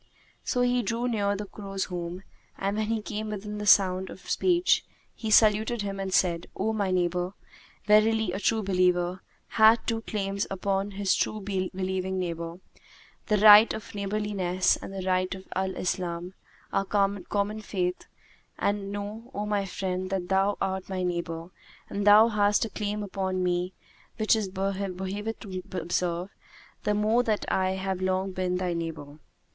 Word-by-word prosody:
So 250 - 0
he 245 0 +2
drew 230 +3 -1
near 205 -4 0
the 205 +1 -4
crow's 195 -1 -5
home 175 +1 -5 0.3
and, 195 +1 -1
when 215 -1 0
he 225 -1 -1
came 215 +1 -4
within 210 0 -5
sound 190 -2 +5
of 185 - -12
speech, 360 0 +3 0.3
he 220 - -5
saluted 215 +1 +4
him 195 -1 -4
and 195 -1 -3
said, 175 -2 +2
"O 220 +3 -1
my 205 -3 0
neighbour, 180 +1 0 0.5
verily 215 -1 +4
a 190 - -3
true 220 +1 +1
believer 180 -1 +1 0.3
hath 220 +1 +5
two 225 -1 -1
claims 200 -2 -2
upon 195 +1 -1
his 200 -2 +2
true 215 - 0
believing 190 -1 -2
neighbour, 170 -2 -3 0.7
the 210 - +3
right 210 +2 +9
of 220 - -9
neighbourliness 200 -3 0
and - - -8
the 190 -1 -5
right 185 0 +1
of 190 0 -12
Al 190 0 -1
Islam, 180 0 -3 0.4
our 195 - +2
common 200 +1 0
faith; 180 -4 -2 0.5
and 200 -1 -1
know, 205 +4 -6
O 205 +1 -2
my 205 -1 0
friend, 185 0 -3
that 190 -2 -3
thou 195 +1 +2
art 190 -1 -2
my 185 -1 -2
neighbour 170 -1 -3 0.4
and 205 +1 -2
thou 210 +2 +8
hast 210 -1 +2
a 220 - -7
claim 210 0 -3
upon 190 -2 -2
me 180 +1 -1 0.4
which 215 +1 +3
it 205 -4 -2
behoveth 195 -1 -2 0.5
me 185 -2 -5
to 185 - -5
observe, 175 +1 -2 0.5
the 210 - +2
more 215 +3 +3
that 220 -4 -1
I 190 0 +1
have 190 -1 -3
long 185 +1 0
been 185 -1 -1
thy 180 -1 -1
neighbour. 160 -3 -5
195 Hz, 160 wpm, -27 LUFS, 185-210 Hz, 0.7 s, right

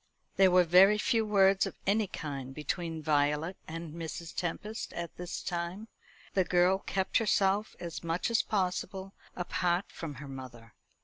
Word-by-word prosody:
There 190 -1 +6
were 180 0 +6
very 185 +5 +6
few 225 +1 +2
words 195 -2 +4
of - - -7
any 205 +1 +2
kind 135 -6 -6
between 160 +1 -3
Violet 150 +3 +1
and 165 -1 -6
Mrs. 165 0 -6
Tempest 210 +5 -4
at 170 -1 -5
this 180 0 -5
time. 180 +4 -4 0.4
The 190 - +3
girl 180 +2 +3
kept 190 -1 0
herself 205 -1 +1
as 170 -1 -6
much 170 +7 -1
as 230 - +4
possible 190 0 -2 0.2
apart 180 0 -1
from 155 -4 -6
her 140 +3 -9
mother. 125 -4 -10
175 Hz, 150 wpm, -31 LUFS, 160-195 Hz, 0.4 s, There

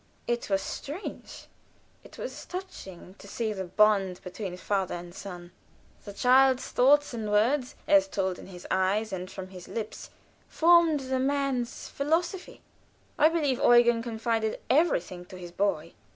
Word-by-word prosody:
It 240 -2 -2
was 195 -1 +1
strange, 310 +9 -7 0.6
it - - -15
was - - -7
touching, 355 - -8
to - - -12
see 220 +1 -2
the 190 -2 -5
bond 195 -1 +2
between 180 0 -6
father 195 -1 -1
and 175 0 -9
son. 175 -2 -9 0.5
The 205 - -7
child's 260 +3 +4
thoughts 285 +2 +4
and 220 -3 -4
words, 245 +6 +1
as 295 -1 +5
told 190 -8 -2
in - - -11
his 180 -2 -11
eyes 195 +3 +1
and 185 0 -5
from 185 -1 -8
his 180 -2 -11
lips, 220 -2 -6 0.4
formed 335 -3 +4
the 260 0 -2
man's 270 -2 -1
philosophy. 335 +6 -2 0.6
I 310 - +6
believe 295 -6 0
Eugen 240 -1 +5
confided 225 -1 -2
everything 190 - +1
to 185 - -11
his 175 -1 -9
boy. 175 -4 -1
225 Hz, 150 wpm, -28 LUFS, 190-275 Hz, 0.6 s, I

